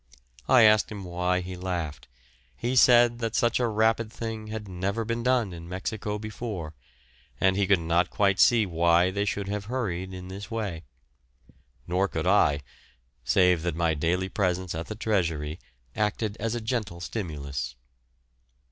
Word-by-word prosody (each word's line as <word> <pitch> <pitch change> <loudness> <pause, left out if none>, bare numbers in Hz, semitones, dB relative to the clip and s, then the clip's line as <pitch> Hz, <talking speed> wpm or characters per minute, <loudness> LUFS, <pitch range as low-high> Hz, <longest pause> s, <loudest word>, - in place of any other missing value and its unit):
I 125 - +7
asked 110 0 +5
him 100 -2 -6
why 90 +1 -1
he 90 0 -6
laughed; 90 -4 -4 0.5
he 125 +2 -2
said 120 -2 +5
such 120 -1 +2
a 120 - +2
rapid 110 0 +1
thing 110 -1 -5
had 110 -1 -6
never 100 +5 -2
been 115 +1 -2
done 120 -6 +1
in 85 0 -9
Mexico 105 +3 -3
before, 105 -6 -6 0.7
and 95 0 +3
he 100 -1 +1
could 100 0 +5
not 85 +2 +1
quite 100 -1 +1
see 115 -3 +5
why 85 +1 +3
they 100 +1 -1
should 100 -1 -2
have 100 0 -3
hurried 95 -7 -3
in 90 -1 -8
this 100 +3 -8
way; 105 -8 -4 1.0
nor 90 +3 +1
could 80 -3 -3
I, 90 -7 +3 0.6
save 90 -3 +3
that 85 -2 -2
my 85 -1 +1
daily 85 +5 0
presence 95 -2 -1
at 80 +1 -5
the 110 - -5
Treasury 85 -8 -1 0.4
acted 105 0 -1
as 115 +1 -1
a 120 - -3
gentle 110 -6 -3
stimulus. 70 - -5
100 Hz, 155 wpm, -27 LUFS, 85-110 Hz, 1.0 s, I